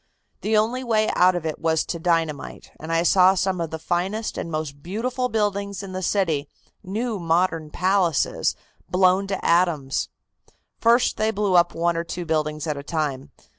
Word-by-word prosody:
The 215 0 +1
only 235 +4 +1
way 220 -3 +1
out 180 0 +5
of 175 -2 -3
it 155 -2 -3
was 160 -1 +1
to 170 - -4
dynamite, 165 -3 -2
and 160 +1 -6
I 165 0 +2
saw 185 +1 +5
some 185 -1 0
of 165 - -2
the 160 - -5
finest 185 +7 -2
and - - -4
most 155 -3 -4
beautiful 245 - -2
buildings 200 -3 -1
in 195 - -7
the 185 0 -4
city, 165 -7 0 0.3
new 215 +3 -3
modern 165 -2 0
palaces, 185 -3 +1 0.3
blown 185 +1 +3
to 195 -1 -4
atoms. 165 -6 +1 0.7
First 235 +2 +3
they 215 0 +1
blew 205 -3 0
up 175 -1 +4
one 170 +1 +1
or 165 - -1
two 175 +1 -5
buildings 155 -1 -1
at 150 -2 -2
a - - -5
time. 145 -4 -3
180 Hz, 175 wpm, -23 LUFS, 160-200 Hz, 0.7 s, out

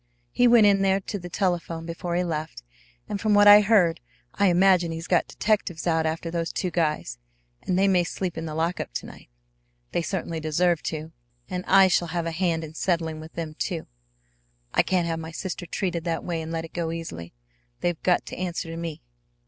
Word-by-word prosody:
He 245 - +4
went 235 -3 +7
in 200 -1 +4
there 195 0 +3
to 200 +1 -5
the 175 0 -8
telephone 170 -3 -1
before 170 +1 -4
he 180 - +1
left, 155 - -4 0.4
and 200 - -4
from 215 -2 +3
what 205 0 +6
I 205 0 +10
heard 195 -6 +3 0.3
I 200 - +2
imagine 180 -1 +4
he's 165 0 -5
got 175 -2 +2
detectives 205 -6 -1
out 160 -2 +2
after 165 +1 -3
those 165 -1 -2
two 180 - -2
guys, 150 - -1 0.4
and 180 - -1
they 195 +1 +4
may 185 -2 +4
sleep 180 +1 -4
in 165 0 -4
the 155 - -5
lockup 165 - -2
to - - -4
night. - - -13 0.6
They - - 0
certainly 170 -2 -3
deserve 160 +2 +1
to. 160 0 -6 0.4
And 180 -1 -3
I 195 -1 +7
shall 175 -1 +2
have 170 +1 -2
a 165 - -2
hand 165 -1 0
in 155 -1 -8
settling 165 -2 -1
with 160 +1 -11
them, 160 -2 -5
too. 170 -5 -2 0.9
I - - +5
can't 180 -2 +1
have 165 -1 -2
my 160 0 -6
sister 175 +1 -5
treated 175 -1 -2
that 165 -1 -2
way 170 -2 -3
and 160 0 -6
let 165 0 -3
it 165 - -14
go 170 -2 -2
easily. 85 - -7 0.5
They've 175 -2 -1
got 180 -1 +2
to - - -7
answer 175 -2 -3
to 165 - -6
me. 165 -2 -6
170 Hz, 210 wpm, -25 LUFS, 165-185 Hz, 0.9 s, I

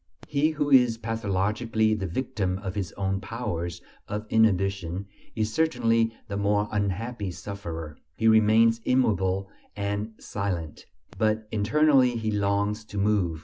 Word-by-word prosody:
He 150 +1 +2
who 150 -2 -1
is 125 -4 +6
pathologically 110 0 0
the 100 -3 -2
victim 95 -2 -2
of 95 -2 -3
his 95 -5 -3
own 95 -1 -1
powers 90 -7 -4 0.2
of 105 +1 -4
inhibition 95 -4 +1 0.3
is 110 -1 -1
certainly 115 -8 +2 0.2
the 100 -2 -4
more 105 +1 +1
unhappy 105 +1 -2
sufferer; 85 -5 -7 0.2
he 115 - +1
remains 110 +1 +5
immobile 95 -6 +1 0.2
and 105 +2 -3
silent; 90 -7 -4 0.3
but 110 0 +1
internally 130 +3 +3
he 110 -1 -1
longs 100 +1 0
to 105 - -8
move. 100 -5 +1
105 Hz, 130 wpm, -26 LUFS, 95-115 Hz, 0.3 s, is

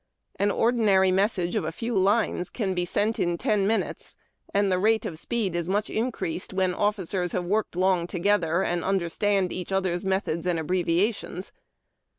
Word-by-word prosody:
An 200 - +2
ordinary 205 -5 +3
message 185 -2 +1
of - - 0
a 160 - -2
few 230 +7 -4
lines 195 -1 +1
can 200 -6 -2
be 180 -1 -1
sent 210 +5 0
in 175 0 0
ten 200 +1 +1
minutes, 225 +1 -2 0.4
and 200 -1 +2
the 185 - +2
rate 220 +2 +2
of 155 - -5
speed 210 -4 -2
is 170 0 -2
much 205 +2 0
increased 220 -7 -3
where 185 -1 +1
officers 190 -3 -1
have 180 -1 -1
worked 210 +1 -1
long 185 -1 +2
together, 180 -1 +1
and 175 -2 -1
understand 195 +1 0
each 185 +1 -6
other's 185 -2 0
methods 190 -3 -1
and 175 -2 +1
abbreviations. 180 +3 -1
190 Hz, 165 wpm, -26 LUFS, 175-205 Hz, 0.4 s, ordinary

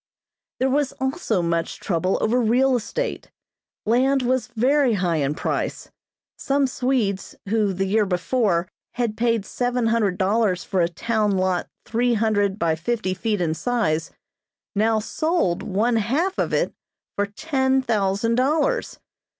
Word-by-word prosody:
There 260 - +2
was 285 0 +1
also 265 - -1
much 170 0 -1
trouble 185 +1 0
over 240 +3 +2
real 250 +4 +3
estate. 485 - -3 0.6
Land 260 +4 +3
was 255 +1 0
very 260 +2 +2
high 180 -5 0
in 145 0 0
price. - - -3 0.5
Some 275 0 +1
Swedes, 250 -7 -1
who, 215 -2 +2
the 190 +1 -1
year 210 +2 +2
before, 180 -1 +1 0.3
had 235 -3 -1
paid 230 -2 +1
seven 245 +2 -1
hundred 220 -5 +1
dollars 200 -1 +1
for 190 -2 0
a 170 - +2
town 215 +3 0
lot 185 -1 0 0.2
three 240 +1 +1
hundred 205 -3 +1
by 165 -5 +1
fifty 185 +4 -2
feet 205 +1 -1
in 160 -2 +1
size, 165 -6 -1 0.7
now 220 +2 +2
sold 225 - 0
one 225 +5 +1
half 285 - 0
of - - 0
it - - 0 0.4
for 205 0 0
ten 265 +3 0
thousand 215 -1 +1
dollars. 310 - +1
225 Hz, 140 wpm, -23 LUFS, 190-255 Hz, 0.7 s, real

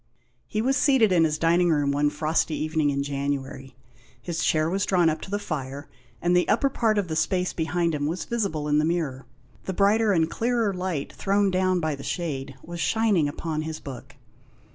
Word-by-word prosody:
He 215 - -2
was 270 +2 +2
seated 265 -7 +4
in 170 -3 +4
his 155 -1 0
dining 170 +2 +3
room 145 -3 +2
one 145 +1 +2
frosty 155 +1 0
evening 155 -1 0
in 140 0 -1
January. 140 -2 -4 0.4
His 170 -2 -3
chair 155 0 +2
was 195 +4 0
drawn 175 -5 +3
up 155 - -5
to - - -8
the 205 - -1
fire, 145 -7 -5 0.4
and 175 +1 +3
the 180 - +3
upper 275 +5 +3
part 225 -4 +1
of 200 -3 0
the 160 - -3
space 180 +2 0
behind 165 +1 0
him 145 -1 -1
was 170 +4 -3
visible 195 -11 -2
in 150 0 +3
the - - +2
mirror. 155 -5 -2 0.4
The 190 - -3
brighter 205 +3 +3
and 165 -4 +3
clearer 230 +1 0
light 180 -6 -3
thrown 200 0 +1
down 185 0 +1
by 155 -2 0
the 140 - -7
shade 140 -3 -4
was 170 0 -7
shining 205 -8 +2
upon 155 +1 -3
his 155 0 -5
book. 135 +1 -10
165 Hz, 200 wpm, -25 LUFS, 150-190 Hz, 0.4 s, seated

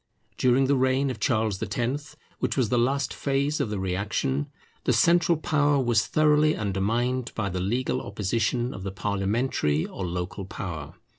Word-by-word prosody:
During 130 +1 +3
the 140 +1 +3
reign 130 +1 +2
of 115 - -7
Charles 110 -4 0
X, 120 +7 -3 0.2
which - - -1
was 125 -5 +2
the 125 - +2
last 135 +2 +1
phase 140 +2 0
of - - 0
the 105 - -2
reaction, 90 -7 -1 0.4
the - - +3
central 170 -1 +4
power 145 -2 +2
was 120 -4 +2
thoroughly 155 0 +3
undermined 115 +5 -1
by 105 -3 -1
the 90 0 -3
legal 120 +7 -1
opposition 110 +5 -1
of 95 - -8
the 95 0 -4
parliamentary 100 - 0
or 95 - -6
local 90 +2 -4
power. 80 -6 -6
120 Hz, 160 wpm, -26 LUFS, 95-135 Hz, 0.4 s, central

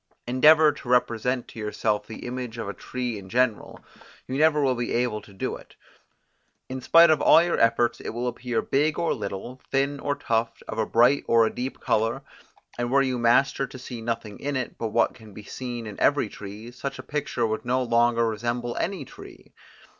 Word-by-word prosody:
Endeavour 150 +5 +6
to 140 -3 -10
represent 125 0 +1
to - - -11
yourself 105 -1 -1
the 110 - -8
image 125 -1 -5
of 115 -3 -4
a 100 - -4
tree 125 -2 -4
in 95 -1 -12
general, 125 -1 0 0.5
you 130 - -4
never 150 +1 +4
will 130 -2 +3
be 120 -1 -3
able 120 -3 0
to - - -16
do 95 - -4
it; - - -15 0.9
in 130 0 -6
spite 165 +4 +7
of 155 - +2
all 165 - +7
your 175 - 0
efforts 115 +1 +2
it - - -5
will 120 +2 -3
appear 120 -1 -2
big 150 +3 +1
or 170 - +1
little, 105 +4 -6
thin 140 +1 0
or 145 +1 -1
tufted, 115 -2 -2
of - - -5
a 110 - 0
bright 120 +5 +4
or 115 -1 +5
a 110 - -2
deep 130 +2 -5
colour; 115 +5 0 0.6
and 120 0 -1
were 140 +1 +4
you 130 -2 -1
master 125 +4 +3
to - - -10
see 125 -2 -8
nothing 115 -2 -4
in 145 0 -3
it, 130 -2 -3
but 115 - -3
what 115 +2 +1
can 110 -5 -15
be 105 - -9
seen 120 +1 -6
in 105 -2 -8
every - - +2
tree, 105 +3 -9
such 135 +3 -6
a 130 - -8
picture 140 -4 -2
would 110 -1 -2
no 125 +1 0
longer 115 -1 +2
resemble 120 +2 -2
any 185 -7 -2
tree. - - -14
120 Hz, 205 wpm, -25 LUFS, 115-130 Hz, 0.9 s, spite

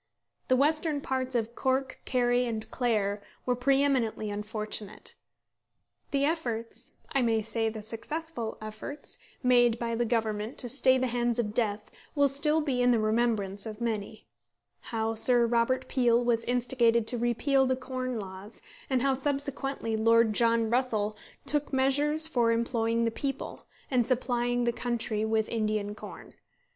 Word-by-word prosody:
The 255 - +4
western 305 +2 +1
parts 260 -2 -2
of 230 0 -1
Cork, 260 +1 -1
Kerry, 245 -1 +2
and 220 -2 -3
Clare 210 -5 0 0.2
were 250 - +1
pre 270 +3 +2
eminently 230 -6 0
unfortunate. 210 0 -5 1.0
The 280 0 +1
efforts 240 -8 -3 0.2
I 275 - +2
may 225 -2 +1
say 225 +1 0
the 215 -1 -7
successful 235 +2 -5
efforts 215 +7 -7 0.2
made 240 -2 +4
by 235 0 -3
the 235 +1 0
Government 220 -1 -1
to 245 - -4
stay 260 +1 +4
the 260 - 0
hands 240 -1 0
of 210 -3 -1
death 210 -3 -1 0.2
will 285 -1 +4
still 300 +3 +1
be 265 -5 0
in 245 - +4
the 240 -2 +4
remembrance 215 -2 0
of 215 0 -7
many: 220 -2 -3 0.6
how 225 -1 -1
Sir 240 +1 +4
Robert 235 +2 +1
Peel 240 -2 +2
was 230 -1 +1
instigated 240 -2 +2
to 240 +1 -2
repeal 265 +3 +2
the 260 - +2
Corn 255 -1 -4
Laws; 195 +2 -9 0.3
and 260 -2 +1
how, 275 -1 +3
subsequently, 275 -3 -2
Lord 230 0 +4
John 230 0 +2
Russell 220 -4 0 0.3
took 295 0 +2
measures 290 +4 +4
for 240 -7 +2
employing 230 0 0
the 230 - 0
people, 275 +3 -5 0.2
and 245 -3 +2
supplying 245 -1 0
the 235 0 +1
country 230 -3 -2
with 220 0 +1
Indian 215 -2 -1
corn. 210 - -11
240 Hz, 150 wpm, -29 LUFS, 225-260 Hz, 1.0 s, The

